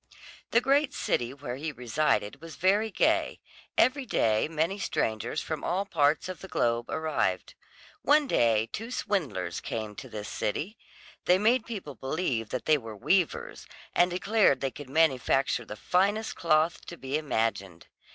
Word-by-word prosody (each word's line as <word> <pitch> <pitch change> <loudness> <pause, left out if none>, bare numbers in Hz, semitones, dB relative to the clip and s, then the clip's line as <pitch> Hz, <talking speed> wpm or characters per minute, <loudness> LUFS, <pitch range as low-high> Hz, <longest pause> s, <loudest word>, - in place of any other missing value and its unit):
The 235 - +4
great 280 +2 +2
city 125 -9 0
where 135 -2 -6
he 155 +3 -3
resided 125 -1 0
was 165 -1 -9
very 200 +5 +2
gay; - - +1 0.4
every 270 +2 +3
day 110 - +2
many 165 +5 -1
strangers 110 - -1
from 155 -2 -4
all 190 +3 0
parts 150 -5 +2
of 185 -1 -7
the 190 - -8
globe 120 -7 0
arrived. 160 0 -1 0.5
One 295 +1 +4
day 115 - +2
two 225 +2 -5
swindlers 140 - -2
came 110 -2 -4
to - - -8
this 105 0 -6
city; 165 - -3 0.5
they 180 - +5
made 225 +4 +2
people 195 -11 -6
believe 130 - -2
that 130 - -4
they 155 -1 +4
were 115 -3 -8
weavers, 180 - 0 0.3
and 175 +1 +4
declared 185 -4 +3
they 135 0 -2
could 145 -1 -10
manufacture 135 -4 +2
the 105 - -7
finest 200 - +1
cloth 160 0 +2
to 170 - -8
be 135 -1 -4
imagined. 110 - -1
155 Hz, 155 wpm, -28 LUFS, 120-190 Hz, 0.5 s, they